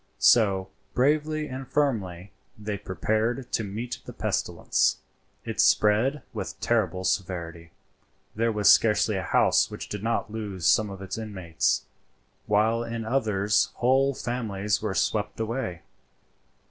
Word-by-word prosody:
So, 95 -5 +4 0.3
bravely 150 +3 +1
and 130 0 -7
firmly, 100 -11 -1 0.3
they 105 -1 -4
prepared 110 +6 -1
to 115 - 0
meet 110 +4 -5
the - - -8
pestilence; - - 0 0.5
it - - -5
spread 115 +7 +3
with - - -5
terrible 95 -6 0
severity. 85 -3 -3 0.7
There 115 +2 +1
was 105 -2 +5
scarcely 105 -1 +3
a 95 - -1
house - - +3
which - - -8
did 105 - -5
not 115 0 -1
lose 100 -6 -5
some 105 +4 +4
of 95 -1 -8
its 95 +3 -5
inmates, 95 -7 -1 0.6
while 110 +3 +2
in 115 -1 -5
others 110 -4 +1
whole 135 +2 +2
families 105 -5 -2
were - - -2
swept - - -1
away. 110 -6 -3
110 Hz, 130 wpm, -26 LUFS, 95-120 Hz, 0.7 s, was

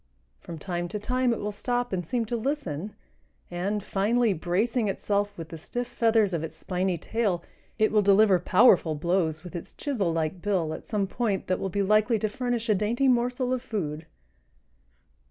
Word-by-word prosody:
From 165 - -8
time 175 +2 -3
to 190 - -4
time 250 +4 0
it 230 - -1
will 210 - -3
stop 245 +2 -2
and 180 -1 -1
seem 230 +7 -1
to 235 - -3
listen, 215 - -3 0.6
and, 195 +4 -2
finally 220 +3 +2
bracing 205 +7 0
itself 205 +1 -1
with 165 -2 -7
the 165 - -8
stiff 245 +9 -3
feathers 225 -4 +2
of 165 -2 -1
its 160 - -6
spiney 185 -1 0
tail, 200 -6 -1 0.3
it 215 -1 +3
will 215 - +4
deliver 200 -1 +5
powerful 180 -4 +4
blows 160 0 0
with 180 0 -9
its 170 - -7
chisel 220 - -1
like 165 +2 -2
bill 180 -6 0
at - - -9
some 210 -3 0
point 205 -1 -1
that 185 - 0
will 195 - -2
be 200 +2 0
likely 215 +3 +3
to 215 - 0
furnish 240 +1 -2
a 215 - +4
dainty 225 +7 +1
morsel 250 +1 +1
of 255 - -1
food. 160 - -4
205 Hz, 185 wpm, -27 LUFS, 175-235 Hz, 0.6 s, deliver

